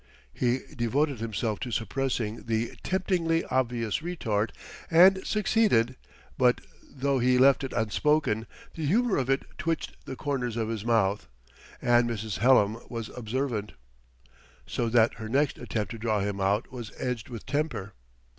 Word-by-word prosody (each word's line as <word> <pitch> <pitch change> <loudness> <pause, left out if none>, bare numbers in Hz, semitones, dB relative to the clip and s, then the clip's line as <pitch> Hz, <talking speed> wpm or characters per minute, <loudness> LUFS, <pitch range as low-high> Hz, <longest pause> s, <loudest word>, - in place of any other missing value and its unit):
He 125 +1 +1
devoted 130 +2 0
himself 110 -1 -2
to 125 - -4
suppressing 120 -2 -2
the 115 0 -1
temptingly 180 -3 0
obvious 120 -4 0
retort, 115 -11 -1 0.4
and 190 +3 +6
succeeded; 210 - +2 0.4
but 125 -1 +4 0.3
though 135 0 0
he 125 +1 +3
left 135 +2 +5
it 135 - -4
unspoken, 115 0 +1 0.3
the 160 - -5
humor 215 +8 +2
of 130 -1 -1
it 135 0 +2 0.2
twitched 165 -1 -3
the 130 - -6
corners 125 -5 -2
of 110 -1 -1
his 110 -3 -3
mouth; 110 -4 +1 0.6
and 120 0 +4
Mrs. 110 -3 -3
Hallam 115 -2 +4
was 115 -2 -5
observant. 120 -2 -2 0.9
So 115 - -1
that 115 0 +4
her 110 -1 -6
next 140 +3 +1
attempt 110 -5 -3
to 115 - -6
draw 110 -2 0
him 100 0 -2
out 100 +3 +1
was 120 -4 -7
edged 125 -4 -3
with 115 -3 -8
temper. 130 -9 -2
120 Hz, 145 wpm, -28 LUFS, 110-140 Hz, 0.9 s, and